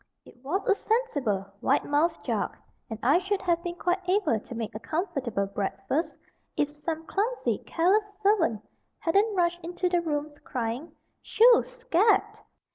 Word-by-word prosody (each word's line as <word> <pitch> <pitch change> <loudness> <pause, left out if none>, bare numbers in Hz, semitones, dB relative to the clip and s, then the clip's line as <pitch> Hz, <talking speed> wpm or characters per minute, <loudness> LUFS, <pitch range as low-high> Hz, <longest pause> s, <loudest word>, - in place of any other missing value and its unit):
It - - -16
was 370 - -2
a 410 - +6
sensible, 290 - 0 0.2
wide 275 - +2
mouthed 300 +4 +1
jug, - - -1 0.3
and 220 - -4
I 280 +8 +5
should 390 +2 -1
have 340 -2 +1
been 345 0 -4
quite 355 +1 0
able 375 - +2
to 240 - -10
make 225 -2 -4
a 215 - -5
comfortable 260 - -2
breakfast, 200 - -2 0.4
if 290 0 +1
some 315 +2 -5
clumsy, 450 +8 -1
careless 405 +4 +1
servant 370 - +2 0.3
hadn't 400 +5 +2
rushed 345 -1 +1
into 355 +2 -2
the 350 -1 +2
room, 300 -2 -2
crying 250 +5 -3 0.3
"Shoo! 470 +2 +6
scat!" 430 -3 +1
340 Hz, 150 wpm, -27 LUFS, 275-405 Hz, 0.4 s, a